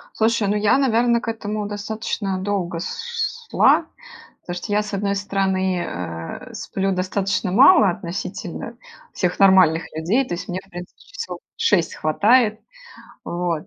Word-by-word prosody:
Слушай, 225 -1 +2
ну, 205 - +1
я, 210 +3 +3
наверно, 235 -3 +2
к - - -9
этому 215 -2 -3
достаточно 205 -1 -3
долго 185 -4 -2
с 470 - -5 0.3
с - - -41
шла, - - +4 0.6
то, 175 - -4
что 180 +3 -4
я, 210 +1 +2
с 210 -1 -8
одной 200 0 0
стороны, 190 -2 0
э, 85 -1 -6
сплю 195 0 -2
достаточно 185 +1 -1
мало 265 - +7
относительно 175 0 -5 0.4
всех 180 -2 -1
нормальных 185 -4 +5
людей, 190 +12 +1
то - - -4
есть 175 - -6
мне, 180 +1 -2
в 195 - -26
принципе, 175 -1 -10
часов - - -7 0.2
6 175 -6 +1
хватает. 215 +7 +3 0.7
Вот. 170 -2 -2
195 Hz, 150 wpm, -21 LUFS, 180-215 Hz, 0.7 s, мало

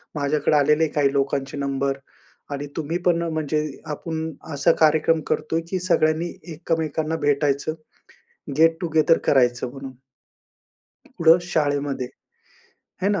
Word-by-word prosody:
माझ्याकडे 150 +1 +1
आलेले 150 +2 +3
काही 145 -2 +1
लोकांचे 140 0 -1
नंबर, 140 -1 -1 0.5
आणि 145 0 -4
तुम्ही 160 +2 -2
पण 175 -1 +4
ना 170 0 -2
म्हणजे 155 -1 -1 0.3
आपण 160 +1 -4 0.2
असा 145 +4 +3
कार्यक्रम 160 +1 +3
करतोय 160 +2 -1
की 185 - -1
सगळ्यांनी 170 -2 +1 0.2
एकमेकांना 160 -1 -2
भेटायचं 145 +1 +1 0.9
गेट 165 0 +5
टु 175 - -2
गेदर 160 +1 +4
करायचं 125 -2 +2
म्हणून. 135 0 -9 1.2
कुठे? 165 -1 +6
शाळेमध्ये. 145 -5 -1 0.9
आहे 190 - +1
ना? 200 - 0
155 Hz, 125 wpm, -23 LUFS, 140-160 Hz, 1.2 s, कुठे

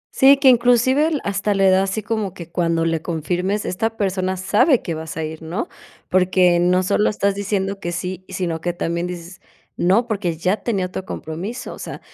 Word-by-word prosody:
Sí, 275 0 +7
que 275 -1 +2
inclusive, 245 +4 +4
l 315 -3 -1
hasta 200 +1 0
le 195 -1 +4
da 185 - +4
así 195 +3 -2
como 215 -4 -2
que 170 -2 -8
cuando 165 -1 0
le 165 -1 0
confirmes, 180 +5 -2
esta 225 +5 -2
persona 190 -2 -1
sabe 215 - +3
que 170 - -3
vas 160 0 -6
a 160 - -2
ir, 155 +1 -6
¿no?, 175 - -4 0.4
porque 180 -1 +3
no 180 +1 +3
solo 205 +3 +2
estás 200 -1 0
diciendo 200 -1 -2
que 175 -3 -4
sí, 180 +1 -4
sino 175 -4 -3
que 175 -1 -1
también 170 0 -2
dices: 175 +1 -8 0.3
"No, 195 +7 +3
porque 190 -7 -2
ya 185 +5 +1
tenía 200 -6 -1
otro 185 +1 -5
compromiso", 185 +8 -6
o - - -12
sea, - - -7
185 Hz, 200 wpm, -21 LUFS, 175-210 Hz, 0.4 s, Sí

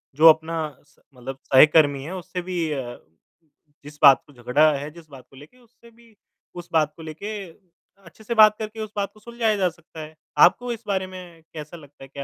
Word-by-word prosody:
जो 155 +3 +6
अपना 160 +1 +2 0.3
स 145 - -29 0.2
मतलब 130 +2 -8
सहकर्मी 145 0 +4
है 170 +6 -7
उससे 180 0 -6
भी 175 -3 -3
अ, 130 -4 -6 0.9
जिस 150 0 -12
बात 140 -2 +8
को 145 - -19
झगड़ा 140 +5 +2
है, 145 +2 -6
जिस 160 -1 -16
बात 135 -3 -14
को - - -20
लेके 145 - -16
उससे 235 -1 -22
भी 230 -1 -23 0.4
उस 175 -1 -10
बात 155 -2 +1
को 165 - -11
लेके 160 +7 -7 0.7
अच्छे 170 +6 -17
से 235 - -3
बात 215 -1 +6
करके 220 0 -7
उस 215 -1 -7
बात 200 -1 -2
को 215 - -20
सुलझाया 230 -1 -1
जा 185 -2 +1
सकता 165 -1 -15
है। 155 +1 -11 0.3
आपको 245 0 -5
इस 230 0 -11
बारे 190 -2 -1
में 180 -3 -12
कैसा 155 +2 -9
लगता 145 -3 -16
है, - - -11
क्या 140 0 -8
165 Hz, 210 wpm, -23 LUFS, 145-205 Hz, 0.9 s, बात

